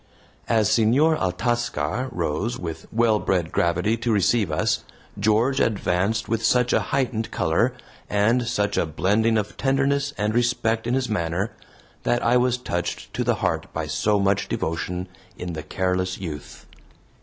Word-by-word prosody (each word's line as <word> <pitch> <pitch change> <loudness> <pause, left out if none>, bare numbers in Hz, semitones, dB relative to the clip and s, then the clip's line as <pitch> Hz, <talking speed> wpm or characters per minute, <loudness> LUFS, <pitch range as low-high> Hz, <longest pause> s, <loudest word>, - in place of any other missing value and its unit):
As 110 -3 +3
Senor 125 +9 +4
Altascar 115 - -1
rose 85 +7 -2
with 80 -2 -6
well 110 -2 +3
bred 90 -4 0
gravity 90 +6 +1
to 115 +1 -1
receive 100 -2 +2
us, 75 - 0 0.4
George 110 +6 +2
advanced 105 +1 0
with 115 0 -1
such 125 +2 +3
a - - +4
heightened 120 -5 -1
color, 115 +10 +1 0.3
and 115 +4 +2
such 105 -2 0
a - - +1
blending 105 +9 +2
of 105 -1 -3
tenderness 140 +1 +1
and 105 +1 0
respect 115 -1 +1
in 120 - +1
his 130 -1 0
manner, 90 0 -1 0.5
that 120 - 0
I 115 +1 +3
was 125 0 +3
touched 90 -8 -4
to - - -1
the - - +2
heart - - -1
by - - -2
so 105 -1 +1
much 100 0 +1
devotion 90 +3 -3 0.3
in 90 -1 -5
the 80 - -4
careless 95 +2 -1
youth. 80 -6 -8
110 Hz, 155 wpm, -24 LUFS, 90-120 Hz, 0.5 s, Senor